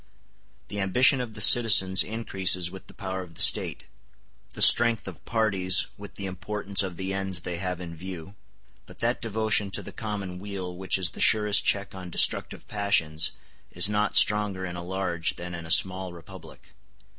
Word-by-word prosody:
The 100 0 -6
ambition 125 +7 +3
of 115 -3 -8
the 105 - -4
citizens 105 -5 +6
increases 95 -5 0
with 95 0 -12
the - - -13
power 95 -1 -6
of 85 -3 -13
the - - -6
State; - - +1 0.7
the - - -7
strength 115 -3 +6
of 90 -5 -10
parties 95 -5 +1
with 100 0 -13
the 100 - -7
importance 95 +2 -1
of 95 -3 -5
the 95 +1 -4
ends 95 -2 -2
they 90 0 -6
have 90 -1 -5
in 85 -2 -9
view; 90 +1 -10 0.5
but - - -15
that 120 +2 -2
devotion 110 -2 0
to 95 - -6
the - - -10
common 100 -4 -7
weal 95 -2 -7
which 95 +1 -2
is 90 -2 -1
the - - -8
surest 105 -1 +3
check 100 0 0
on 95 -2 -9
destructive - - +1
passions 85 -7 0 0.4
is 90 +3 +4
not 105 0 -1
stronger 105 -3 +3
in 90 -1 -7
a 85 - -7
large 90 -2 -3
than 90 0 -9
in 85 -1 -8
a - - -11
small 95 +2 +3
republic. 85 -3 -15
95 Hz, 180 wpm, -25 LUFS, 90-105 Hz, 0.7 s, citizens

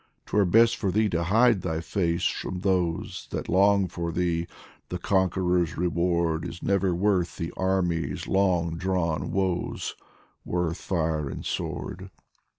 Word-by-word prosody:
'Twere 105 -1 +2
best 115 +5 +5
for 100 -4 -1
thee 110 +3 +2
to 85 -3 -1
hide 115 +2 +4
thy 80 -1 -2
face 85 0 -1
from 90 -1 -2
those 95 +1 -1
That - - -4
long 100 +1 +4
for 85 -1 -4
thee; 85 -1 0 0.4
the 90 - -3
Conqueror's 90 -2 +1
reward 85 -1 +1
Is 85 - -7
never 100 -2 +1
worth 90 -2 +1
the 85 - -4
army's 95 -3 -1
long 90 -4 +1
drawn 90 -4 -1
woes, 95 -2 -1 0.5
Worth 90 -1 -1
fire 80 -5 -1
and - - -7
sword. - - -4
90 Hz, 140 wpm, -26 LUFS, 85-95 Hz, 0.5 s, best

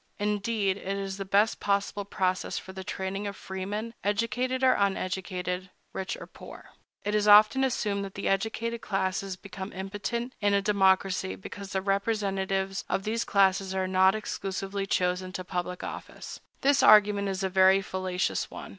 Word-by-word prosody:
Indeed, 205 -1 0
it 195 0 -3
is 195 -1 -4
the 195 - -4
best 205 +3 +2
possible 200 0 0
process 185 -2 -1
for 190 - -7
the 190 0 -7
training 195 +2 -4
of 200 - -5
freemen, 205 +5 -5
educated 230 +5 0
or 260 - +6
uneducated, 185 -1 -2 0.2
rich 190 - -3
or - - -9
poor.It 205 - -10
is 210 0 +2
often 215 +6 +7
assumed 210 -6 0
that 195 - -10
the 200 - -3
educated 225 +4 -1
classes 195 -1 -2
become 190 +1 -8
impotent 205 +6 -4
in 205 -1 +3
a - - +4
democracy, 190 - +2
because 195 - -9
the 190 -1 -1
representatives 195 -1 -1
of 195 - 0
those 225 +3 -1
classes 195 -1 +2
are 190 0 0
not 190 +1 +4
exclusively 195 -1 -4
chosen 180 0 0
to 185 - -4
public 180 0 -4
office. - - -7 0.2
This 280 +1 +4
argument 205 -1 +6
is 195 0 -3
a - - +2
very 190 +1 +5
fallacious 185 -1 -2
one. - - -9
195 Hz, 160 wpm, -28 LUFS, 190-205 Hz, 0.2 s, often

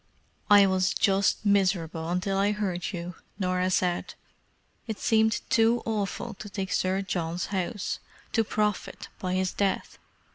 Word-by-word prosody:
"I 205 -1 +8
was 185 -1 +1
just 195 +2 +2
miserable 175 -5 +1
until 180 +2 0
I 200 +2 +2
heard 190 -4 -2
you," 175 -1 -5 0.2
Norah 185 -1 0
said. 180 -1 0 0.7
"It 220 -2 -3
seemed 220 -1 +2
too 230 +1 +3
awful 220 +1 -2
to 205 - -7
take 190 -1 -4
Sir 190 +1 +1
John's 175 -2 -2
house—to 205 +3 -3
profit 210 -1 -2
by 185 -1 -2
his 185 0 0
death. 200 -1 -1
195 Hz, 135 wpm, -27 LUFS, 180-210 Hz, 0.7 s, I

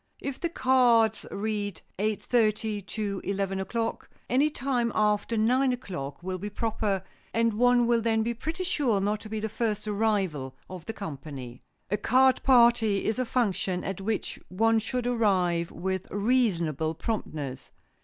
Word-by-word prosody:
If 275 -2 -5
the 340 - -1
cards 245 - +3
read 205 -2 -3 0.2
"eight 210 0 0
thirty 215 -3 +1
to 200 0 -4
eleven 195 0 -1
o'clock," 230 +4 -3 0.2
any 275 +5 +4
time 250 -4 -1
after 210 +2 +1
nine 255 +5 +3
o'clock 175 - -5
will 185 0 -3
be 205 +3 -4
proper 210 -2 -1 0.3
and 230 0 +3
one 245 +2 +4
will 235 -1 +3
then 225 -1 +2
be 235 +1 -1
pretty 320 +10 -4
sure 275 - +1
not 205 +2 0
to 215 - -10
be 220 0 -3
the 220 - -2
first 215 -1 -2
arrival 195 -11 0
of 180 -3 -9
the 225 - -3
company. 140 - -7 0.3
A 205 - +2
card 260 +4 +4
party 235 -5 +4
is 220 +3 0
a 255 - +1
function 195 -6 0
at 195 0 -4
which 215 +2 -2
one 225 +4 +3
should 245 +3 -3
arrive 185 -8 +1
with 190 +2 -3
reasonable 180 - +1
promptness. 150 - -4
215 Hz, 155 wpm, -28 LUFS, 190-235 Hz, 0.3 s, any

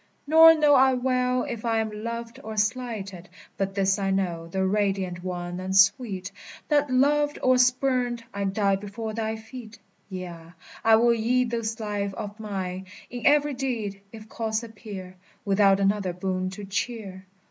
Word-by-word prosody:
Nor 325 +2 +8
know 300 -2 +4
I 265 -1 +5
well 250 0 +1
if 235 -3 -5
I 230 -1 +1
am 220 -1 -1
loved 230 0 -5
or 220 0 -7
slighted; 210 -4 -2 0.3
But 195 -1 -3
this 195 0 +2
I 195 -1 -1
know, 175 -4 -1
thou 190 +3 -3
radiant 190 -2 -1
one 175 -1 -4
and 190 +1 -1
sweet, 195 -2 +3 0.4
That, 290 -2 +2
loved 290 +3 +2
or 255 0 +4
spurned, 250 -1 +1
I 200 0 -2
die 195 0 +1
before 210 +2 -6
thy 220 0 -2
feet! 225 0 -11 0.3
Yea, 175 -3 -8 0.3
I 225 0 +6
will 235 +1 +4
yield 240 +2 +1
this 230 -1 -3
life 205 -2 -3
of 205 +1 -7
mine 190 -3 -5 0.2
In 245 -1 -2
every 295 0 +4
deed, 230 -7 -3
if 220 -1 -11
cause 220 0 -2
appear, 200 -5 -9 0.3
Without 195 -1 +4
another 195 -2 +1
boon 185 +1 -2
to 200 +2 -8
cheer. 195 -2 -4
215 Hz, 160 wpm, -25 LUFS, 195-245 Hz, 0.4 s, Nor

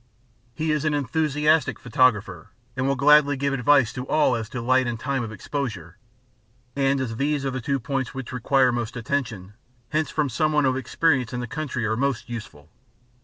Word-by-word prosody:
He 155 +4 -1
is 150 -1 0
an 155 -1 +1
enthusiastic 150 +2 +1
photographer, 105 -8 +1 0.3
and 130 0 -1
will 140 - +1
gladly 145 +1 +5
give 140 +1 -1
advice 135 -1 +3
to 125 0 -6
all 150 -5 +3
as 115 -1 -4
to 125 - -5
light 130 +2 +2
and 120 -1 -3
time 135 +1 -1
of 110 - -6
exposure; 110 - -5 0.8
and 135 0 +1
as 115 -4 -3
these 140 +1 0
are 135 - -1
the 130 0 -4
two 140 +1 -1
points 135 0 -3
which 135 -2 -7
require 130 +1 +2
most 120 0 -3
attention, 115 -6 -3 0.4
hints 155 +1 0
from 150 -2 0
some 155 +5 0
one 150 -2 +3
of 130 -1 +2
experience 130 0 0
in 125 - -2
the 120 - -3
country 130 -2 -3
are 110 +1 0
most 135 0 -1
useful. 80 -10 -8
130 Hz, 190 wpm, -24 LUFS, 120-145 Hz, 0.8 s, gladly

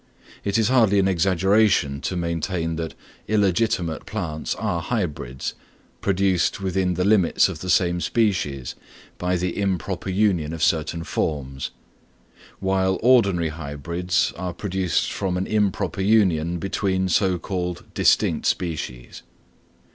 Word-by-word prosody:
It 100 +1 0
is 110 0 +2
hardly 115 -6 +4
an 95 -1 +3
exaggeration 95 -4 +2
to 95 - -2
maintain 85 0 -2
that 80 -1 -4 0.3
illegitimate 95 -5 +1
plants 80 -8 -3
are 100 -6 -2
hybrids, 75 - -3 0.5
produced 95 -3 +1
within 95 -1 0
the 90 - 0
limits 100 -4 +4
of - - -6
the 95 - -6
same 90 -1 +2
species 85 - 0 0.5
by 90 0 0
the 90 0 -2
improper 95 -1 -2
union 90 -6 +1
of 80 -2 -3
certain 80 +1 +1
forms, 70 -5 -3 0.9
while 95 0 +1
ordinary 100 -10 +4
hybrids 85 +3 -2
are 90 -1 -4
produced 95 -3 -1
from 95 -2 -1
an 95 - -1
improper 100 -4 0
union 90 -5 +3
between 95 +1 -1
so 95 +1 +2
called 90 0 -4
distinct - - +2
species. 75 -8 -3
90 Hz, 125 wpm, -23 LUFS, 85-100 Hz, 0.9 s, hardly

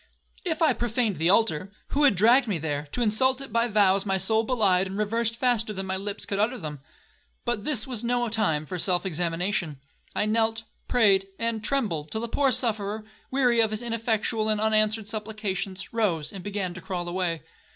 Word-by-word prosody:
If 335 -2 -1
I 300 -5 +5
profaned 230 -5 -1
the 165 +3 +2
altar, 195 -3 +2 0.2
who 290 +1 +2
had 270 - +5
dragged 235 +7 +5
me 200 -5 0
there, 150 -1 -3
to 245 - 0
insult 255 +4 +2
it 275 -5 -8
by 230 +1 +2
vows 200 -3 +3
my 195 -2 0
soul 220 +4 +2
belied 200 -6 +2
and 190 +1 -6
reversed 225 +2 0
faster 235 -3 +1
than 190 -1 -4
my 190 0 -2
lips 200 +1 -5
could 200 - -3
utter 235 +5 +1
them? 150 - -6 0.7
But 240 -4 -2
this 255 -8 +1
was 245 -4 -5
no 240 0 0
time 210 -9 0
for 180 +4 -5
self 180 +1 +1
examination. 175 -2 -1 0.4
I - - +1
knelt, 225 +1 +1 0.2
prayed, 200 -5 +4
and 230 -2 -1
trembled, 200 - -1
till 220 - -3
the 235 - -2
poor 270 +3 +2
sufferer, 220 -3 +1 0.3
weary 250 -3 +2
of 225 -1 +4
his 215 +2 -3
ineffectual 225 -1 0
and 215 -1 +1
unanswered 215 0 +2
supplications, 205 -3 -4
rose, 175 -10 0
and 190 -2 -8
began 200 -3 -3
to 185 - -9
crawl 175 -1 -4
away. 175 -2 -2
215 Hz, 195 wpm, -26 LUFS, 190-230 Hz, 0.7 s, I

